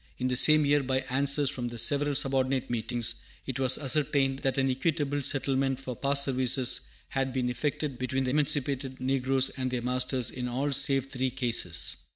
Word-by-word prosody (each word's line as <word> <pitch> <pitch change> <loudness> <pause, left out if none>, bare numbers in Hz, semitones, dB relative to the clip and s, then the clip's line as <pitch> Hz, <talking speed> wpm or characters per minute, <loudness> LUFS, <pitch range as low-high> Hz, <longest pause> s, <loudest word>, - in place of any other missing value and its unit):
In 130 0 -1
the 125 - 0
same 155 +3 +6
year, 145 0 +3
by 130 0 -1
answers 140 +1 +2
from 125 -4 -4
the 120 0 -7
several 145 +5 +2
subordinate 135 -2 0
meetings, 120 0 -1 0.3
it 130 -1 -4
was 130 -1 +2
ascertained 135 -1 0
that 135 -1 -1
an 135 0 +2
equitable 145 +1 -1
settlement 135 -1 0
for 130 -2 -6
past 140 +2 +3
services 130 -1 +2 0.3
had 135 -1 -2
been 125 -1 -1
effected 145 0 -3
between 130 +1 -1
the 125 - -1
emancipated 140 -2 0
negroes 135 0 +1
and 130 -1 -4
their 125 -2 -3
masters 125 -1 0
in 125 -1 -4
all 135 +4 -2
save 135 0 +1
three 130 -1 -1
cases. 115 -9 0
135 Hz, 180 wpm, -28 LUFS, 125-140 Hz, 0.3 s, same